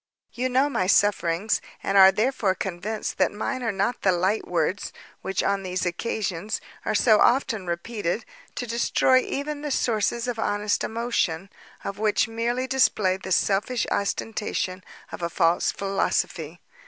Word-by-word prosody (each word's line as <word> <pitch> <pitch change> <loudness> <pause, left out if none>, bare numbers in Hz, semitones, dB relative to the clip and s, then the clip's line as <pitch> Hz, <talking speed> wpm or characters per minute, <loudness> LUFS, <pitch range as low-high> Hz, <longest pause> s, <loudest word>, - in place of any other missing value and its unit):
You 255 +1 -1
know 260 +3 +3
my 190 -10 -1
sufferings, 200 -1 +2 0.2
and 195 - -1
are, 190 -1 +9
therefore, 215 -2 +1
convinced 195 +4 -4
that - - +3
mine 255 +5 -3
are 230 -2 0
not 200 +5 -1
the 190 - +3
light 185 +4 0
words 175 +3 -1 0.3
which, 190 0 -1
on 200 0 +1
these 185 -1 -2
occasions, 195 +1 -2 0.3
are - - 0
so 215 -1 +5
often 230 -7 +2
repeated 175 +3 -3 0.3
to 245 - -3
destroy 240 +2 +3
even 290 +3 -4
the 300 - -3
sources 235 -2 0
of 240 -2 -3
honest 205 -1 0
emotion, 210 -6 -1 0.3
or - - -1
which 210 +2 +1
merely 235 +3 -1
display 220 -8 +2
the 190 0 -8
selfish 210 +7 +1
ostentation 200 -2 -2 0.3
of - - -7
a 170 - -1
false 170 0 +2
philosophy. 175 -4 -2
205 Hz, 150 wpm, -25 LUFS, 185-235 Hz, 0.3 s, are